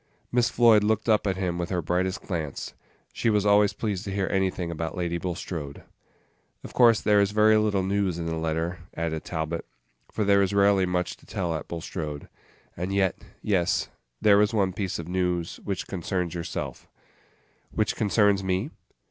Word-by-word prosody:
Miss 120 -1 +3
Floyd 115 -3 +5
looked 110 +1 +1
up 110 -2 +3
at 95 - +1
him 90 -2 -2
with 85 0 -2
her 90 - 0
brightest 90 +3 -1
glance. 80 -6 -4 0.4
She 115 - 0
was 105 -2 +2
always 105 0 +5
pleased 105 -4 -3
to 100 - -4
hear 95 -1 -1
anything 95 -3 0
about 80 +2 -4
Lady 85 -1 -1
Bulstrode. 85 -5 -5 0.8
"Of - - -9
course 115 -3 +6
there 105 -1 +4
is 100 - +2
very 110 +1 +4
little 105 -3 +1
news 95 -2 0
in 85 - -4
the 80 0 -2
letter," 80 +2 -2 0.2
added 80 -1 -2
Talbot, 80 0 -3 0.5
"for 110 - -1
there 100 0 +4
is 100 +1 0
rarely 100 -2 +4
much 90 0 -1
to - - -22
tell 85 -3 -2
at 80 - -5
Bulstrode. 80 -3 -5 0.5
And 90 +3 -3
yet 95 -2 +2 0.3
yes 95 -5 +1 0.3
there 105 -1 +5
is 105 +2 +1
one 95 -3 +1
piece 95 -1 -3
of 85 - -6
news 90 -2 -1
which 100 -3 -3
concerns 90 -2 -3
yourself." 85 -1 -5 0.8
"Which - - -1
concerns 105 -2 +2
me?" 95 - -1
95 Hz, 175 wpm, -26 LUFS, 85-100 Hz, 0.8 s, course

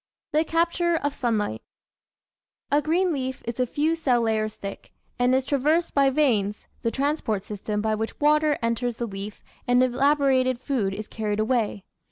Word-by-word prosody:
The 310 +1 +4
Capture 340 +1 +1
of 285 -3 -1
Sunlight 225 -6 -1 1.1
A 290 +1 +4
green 345 +3 +1
leaf 260 -2 -4
is 235 +1 -5
a 250 - +2
few 305 +6 +1
cell 260 -7 +2
layers 215 -1 0
thick, 200 0 -8 0.3
and 250 +1 +3
is 260 0 +1
traversed 300 +5 +1
by 275 -1 +4
veins, 225 -8 +1
the 230 - +1
transport 265 -6 -1
system 210 0 -3
by 220 0 0
which 220 +1 -3
water 300 0 +3
enters 230 +1 0
the 235 - -3
leaf 200 -1 -7 0.2
and 245 +1 +4
elaborated 260 -1 +2
food 235 -8 -1
is 215 +1 -6
carried 215 -2 -3
away. 215 -3 0
255 Hz, 165 wpm, -25 LUFS, 220-295 Hz, 1.1 s, The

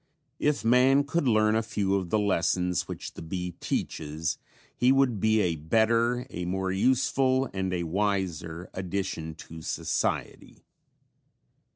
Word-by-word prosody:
If 150 -5 0
man 130 +4 +5
could 145 +1 -1
learn 110 -2 +3
a 110 - +3
few 100 -3 -1
of 95 -3 0
the 110 - +2
lessons 90 -3 +1
which - - -7
the - - -9
bee 90 +2 -4
teaches, 80 +1 -3 0.4
he 125 +1 +4
would 135 -5 +3
be 110 +2 +3
a 85 -4 0
better, 115 +9 +2
a 90 0 -4
more 95 +1 -1
useful 130 +5 +2
and 95 -1 -2
a 90 -1 -1
wiser 90 -2 -2
addition 90 -4 -4
to 80 0 -10
society. - - -3
100 Hz, 140 wpm, -27 LUFS, 90-115 Hz, 0.4 s, man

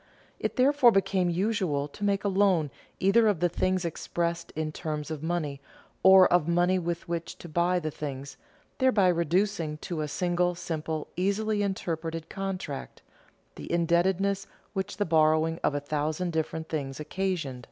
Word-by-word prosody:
It - - -2
therefore 265 -1 +5
became 195 -3 +1
usual 175 -6 0
to 205 - -9
make 200 -1 +1
a - - +1
loan 190 -7 +2 0.3
either 220 +4 +4
of 205 -6 +2
the 175 +1 +2
things 185 +1 0
expressed 170 +1 -2
in 155 0 -2
terms 155 -1 -4
of 155 -2 -4
money, 155 -4 -2 0.4
or 190 -1 +8
of 175 -3 +3
money 175 +2 +3
with 170 -1 -3
which 170 -1 -4
to - - -10
buy 175 +3 +1
the 155 -3 -2
things, 140 -2 -6 0.4
thereby 215 -8 +4
reducing 170 -1 0
to 165 -3 -4
a 150 - -2
single, 175 +2 0
simple, 160 -2 -4
easily 205 +4 0
interpreted 165 -4 -3
contract, 190 -8 -5 0.5
the - - -8
indebtedness 185 +3 +1 0.3
which 190 -1 -3
the 205 - +1
borrowing 160 0 +3
of 145 - +1
a - - +1
thousand 155 +4 -2
different 160 0 -2
things 135 -3 -4
occasioned. 155 -5 -2
175 Hz, 155 wpm, -28 LUFS, 155-190 Hz, 0.5 s, or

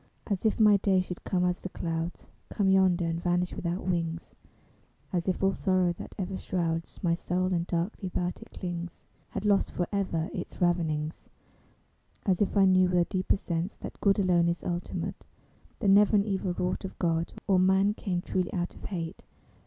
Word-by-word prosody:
As 200 0 -2
if 220 - +2
my 210 -2 +7
days 190 -2 +2
should 180 - -7
come 180 -1 +1
as 180 0 0
the 190 - -6
clouds 165 -1 -4 0.2
Come 200 -2 +1
yonder 185 -2 +4
and 165 0 -2
vanish 175 0 0
without 175 +2 -3
wings; 170 -2 -2 0.8
As 175 0 0
if 185 0 0
all 195 0 +4
sorrow 185 -3 +2
that - - -10
ever 190 0 -3
shrouds 165 -2 -2
My 170 -2 +3
soul 185 +2 0
and 170 0 0
darkly 180 +3 -2
about 180 0 -2
it - - -12
clings 175 -1 -6 0.3
Had 200 - -4
lost 200 -1 +3
forever 180 -2 -1
its - - -6
ravenings. 160 -4 0 1.0
As 190 -2 +2
if 205 - +1
I 195 - +6
knew 185 -1 +5
with 180 - +2
a 175 - +4
deeper 185 +1 0
sense 170 0 -3
That - - -8
good 200 -1 +4
alone 180 -4 +3
is 170 - -2
ultimate; 175 0 -3 0.6
That 205 - +3
never 205 +2 +6
an 200 -1 +4
evil 190 -3 -1
wrought 180 +2 -1
of 190 - -7
God 165 -1 0
Or 190 -2 +4
man 190 +2 +4
came 180 -4 -2
truly 185 -1 -1
out 175 -1 -2
of - - -11
hate. 170 -2 -5
180 Hz, 185 wpm, -29 LUFS, 170-190 Hz, 1.0 s, my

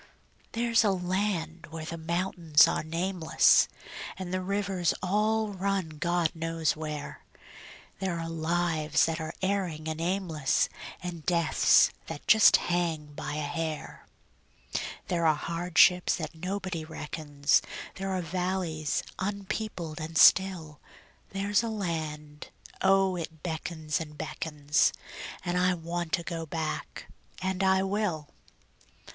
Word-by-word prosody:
There's 230 0 +3
a 210 - +3
land 180 -3 -1
where 160 -1 -6
the 165 - -5
mountains 165 -2 +3
are - - 0
nameless, 165 +1 +3 0.5
And 185 -1 -5
the 185 - 0
rivers 195 -2 0
all 215 +3 +1
run 195 -3 -1
God 175 -1 +1
knows 165 -1 -1
where; 150 -2 -6 0.8
There 185 -3 -2
are 165 - -4
lives 165 -2 +1
that 165 0 -2
are 160 0 -5
erring 185 -5 -1
and 160 0 -3
aimless, 170 -6 +1 0.3
And 175 -3 -5
deaths 170 -2 +4 0.2
that - - -7
just 220 0 +7
hang 165 -4 -1
by 150 - -5
a 155 - -2
hair; 155 +1 -4 1.0
There 170 -2 +1
are 155 - +4
hardships 175 +3 +3
that - - -5
nobody 185 0 -4
reckons; 150 -2 0 0.4
There 195 +1 -3
are 185 -2 -1
valleys 175 -3 -1 0.2
unpeopled 195 -4 -4
and 160 +1 -4
still; 175 -6 +5 0.5
There's 200 +2 +1
a 230 - -3
land 155 -7 -4 0.3
oh, 195 -1 +4
it 160 -2 -7
beckons 160 -2 -3
and 150 -2 -8
beckons, 150 -2 0 0.5
And 180 0 0
I 180 0 +3
want 170 0 -4
to 175 -2 +1
go 165 -2 -4
back 160 0 -4 0.3
and 190 0 -2
I 190 0 +4
will. 190 -6 -1
170 Hz, 125 wpm, -29 LUFS, 160-190 Hz, 1.0 s, just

